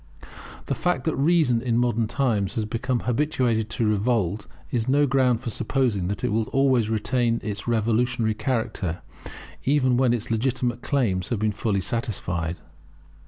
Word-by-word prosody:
The - - -1
fact 180 0 0
that 160 - 0
Reason 140 -5 +3
in 120 -2 0
modern 120 -2 +1
times 110 -5 0
has 110 - 0
become 120 +3 -2
habituated 125 -4 0
to 115 +1 -1
revolt, 105 -2 0 0.2
is 115 -2 -1
no 145 +2 +4
ground 125 -3 +2
for 120 -2 -4
supposing 115 -8 0
that 100 0 -4
it 125 - +1
will 110 +1 +1
always 130 -5 +2
retain 115 +1 +1
its 105 0 -4
revolutionary 115 0 +1
character, 105 - -2 0.6
even 130 -3 +2
when 130 -2 +3
its 120 -1 -2
legitimate 120 +1 0
claims 105 -10 0
have 120 - 0
been 110 +1 0
fully 105 -1 -1
satisfied. 90 -7 -2
115 Hz, 155 wpm, -24 LUFS, 110-130 Hz, 0.6 s, no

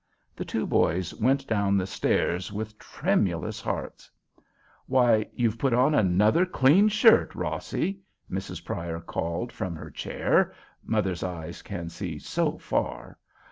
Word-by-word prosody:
The - - -5
two - - -2
boys 90 +2 +1
went 135 +4 +1
down 100 -4 +1
the 95 - 0
stairs 90 -1 0
with 110 +1 -6
tremulous 105 - -1
hearts. - - -5 0.8
"Why, 120 -4 +3
you've 115 -2 0
put 135 -4 +2
on 130 +5 +4
another 105 - +4
clean 180 +3 +4
shirt, 215 +2 +5
Rossie!" 195 0 -2 0.3
Mrs. 95 +1 -5
Pryor 85 -1 -4
called 85 +7 -3
from 95 -7 -4
her 80 - -9
chair—mothers' 95 -5 -1
eyes 85 -2 -5
can 85 -4 -6
see 85 -3 -5
so - - -1
far! - - -3
105 Hz, 130 wpm, -27 LUFS, 90-130 Hz, 0.8 s, shirt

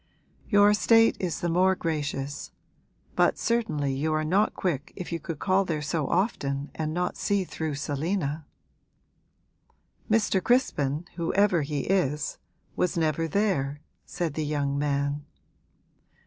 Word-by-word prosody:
'Your 205 -1 +6
state 225 +3 +5
is 175 -5 -2
the 175 - 0
more 185 +3 +3
gracious; 145 -4 -3 0.6
but - - +3
certainly 215 -13 0
you 150 +4 -1
are 155 - 0
not 190 +7 +2
quick 165 -3 -2
if 180 -3 -6
you 170 - -2
could 165 -3 -5
call 190 +4 +2
there 155 -5 -2
so 155 -1 -1
often 145 -7 -1
and 155 -1 -3
not 180 +2 -1
see 200 -1 +1
through 160 -4 -4
Selina.' 150 +2 -2 1.7
'Mr. 210 -4 +2
Crispin, 160 - +1
whoever 180 +1 +2
he 145 -1 -2
is, 150 -6 0 0.4
was 180 - 0
never 165 0 +1
there,' 155 -7 0 0.2
said 170 -4 -3
the 155 - -2
young 145 -2 -1
man. 140 0 -1
160 Hz, 135 wpm, -27 LUFS, 145-190 Hz, 1.7 s, Your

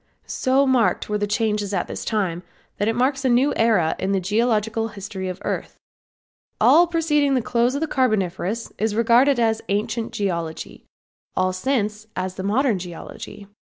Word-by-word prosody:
So 265 +1 +1
marked 255 -6 +2
were 210 0 0
the 205 - -1
changes 210 -1 -1
at 180 - -1
this - - -6
time 190 -6 -1 0.4
that 205 - +1
it 225 - +1
marks 270 +3 +1
a 260 - +2
new 255 +4 +3
era 215 -8 +2
in 190 +1 -1
the 195 - +2
geological 225 +2 0
history 195 -3 -6
of 180 - -5
the - - -14
earth. - - -4 0.8
All 345 +1 +6
preceding 300 -4 +1
the 255 - +2
close 240 +3 +1
of 285 - -2
the 320 - 0
Carboniferous 215 - -1
is 215 -1 0
regarded 240 +4 +4
as 225 -1 +1
ancient 215 +3 -1
geology; 170 -5 -4 0.5
all 185 0 +1
since 210 0 -1
then 220 - -37
as 185 0 -4
modern 215 +2 +1
geology. 180 +3 -9
220 Hz, 170 wpm, -22 LUFS, 195-250 Hz, 0.8 s, All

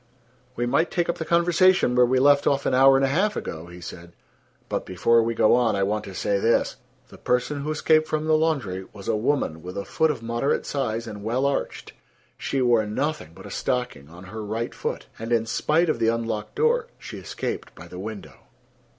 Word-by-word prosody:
"We 120 - -1
might 140 +7 +1
take 175 -2 -1
up 170 - -1
the 160 - -3
conversation 170 -3 +3
where 125 0 +5
we 130 +1 +2
left 140 +2 +4
off 140 0 +1
an - - +1
hour 135 +1 +6
and 135 - +3
a - - 0
half 200 +9 +1
ago," 80 +2 -5
he 85 0 -11
said. 85 0 -10 0.5
"But - - -2
before 115 +6 +2
we 115 +1 -1
go 110 - +4
on, 120 -3 +3
I 100 - +1
want 105 +2 -1
to 95 - -9
say 100 +1 0
this: 115 +3 +1 0.3
The - - -14
person 125 +4 0
who 150 - -4
escaped 155 0 +2
from 155 0 -1
the 155 0 +3
laundry 135 - 0
was 100 -2 -11
a 115 - +1
woman 105 - -1
with 90 +3 -8
a 100 - -3
foot 160 - +1
of 130 -7 -3
moderate 120 +4 -1
size 115 -5 -2
and 105 -3 -8
well 120 +5 0
arched. 140 - -2 0.4
She 135 -2 -1
wore 120 -3 +3
nothing 135 - -3
but - - -12
a - - -9
stocking 125 - -3
on 85 +3 -12
her 105 +4 -7
right 110 +3 -3
foot, - - -4
and, 115 +1 -5
in 115 -1 +2
spite 155 +8 +1
of 155 -7 0
the 115 - +2
unlocked 115 -2 -2
door, 465 +2 +2
she - - -9
escaped - - -5
by - - -11
the - - -9
window." - - -9
120 Hz, 220 wpm, -24 LUFS, 110-150 Hz, 0.5 s, hour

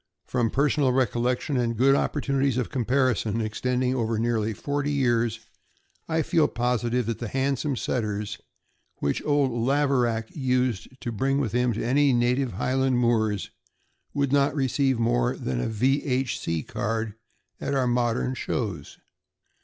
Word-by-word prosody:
From 120 -3 0
personal 140 +1 +2
recollection 125 +2 0
and 115 -2 0
good 135 +3 +5
opportunities 140 -2 0
of 125 - -2
com 125 -4 -1
parison, 125 -4 +1
extending 125 +3 0
over 115 -3 -1
nearly 110 -1 0
forty 145 +6 -2
years, 120 -5 +1 0.7
I 160 0 +1
feel 160 -2 +3
positive 120 0 0
that 115 0 -3
the 120 - -4
handsomest 135 +2 -1
Setters 105 -4 -2 0.6
which 70 - -1
old 145 -3 +2
Laverack 120 -2 +1
used 125 -6 0
to 120 - -3
bring 135 +5 0
with 125 -7 -1
him 125 +1 +1
to 110 - -3
my 125 - -1
native 130 -3 +2
highland 130 +4 +1
moors 110 -4 +1 0.6
would 140 -1 0
not 140 +1 +3
receive 135 -1 +1
more 120 +2 +1
than 65 -2 -2
a - - -1
V. 130 +6 +1
H. 130 -2 -1
C. 80 -3 -2
card 110 0 -2 0.5
at 140 - -2
our 130 -2 +2
modern 120 +1 +1
shows. 110 -7 -4
125 Hz, 145 wpm, -26 LUFS, 115-135 Hz, 0.7 s, good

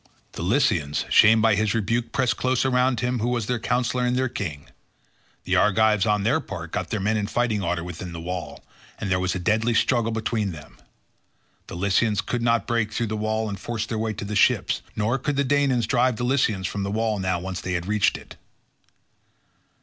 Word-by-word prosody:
The - - -7
Lycians, 85 - +1
shamed 110 +1 +6
by 115 -1 +5
his 105 +1 +1
rebuke, 115 +2 -1
pressed 115 -4 +1
closer 130 +2 0
round 125 -1 +2
him 125 0 -1
who 115 +3 0
was 120 -3 -1
their 125 +1 -1
counsellor 125 +2 0
and 125 0 +1
their 130 +1 +1
king. 85 - -5 0.8
The - - 0
Argives 105 0 +3
on 105 -1 +1
their - - +2
part - - -7
got - - -3
their 110 - -2
men 105 +3 0
in 105 -1 -1
fighting 115 -3 0
order 85 -2 -1
within 90 +1 -7
the 85 - -7
wall, 85 -4 -6 0.3
and 100 -3 -4
there 95 - +2
was 90 0 -1
a - - 0
deadly 110 +5 +1
struggle 115 -1 +2
between 110 -3 -2
them. 70 -6 -13 0.9
The - - -8
Lycians 100 +3 +1
could 120 - -3
not 115 0 +2
break 115 -3 0
through 110 0 -2
the - - -1
wall 110 +1 -1
and 100 -2 -5
force 115 +1 -3
their 110 -1 -4
way 110 0 -1
to 100 - -6
the 105 +1 -4
ships, 100 - +2
nor 110 +5 0
could 145 +3 -2
the 140 - +2
Danaans 135 -4 +2
drive 125 +1 +2
the 120 - -3
Lycians 120 -7 +1
from 100 +4 -3
the 100 - -2
wall 110 0 -1
now 95 -2 -1
that 95 +1 -5
they 90 - -4
had 90 -1 -1
once - - -7
reached 105 -2 +2
it. - - -14
110 Hz, 215 wpm, -24 LUFS, 95-120 Hz, 0.9 s, shamed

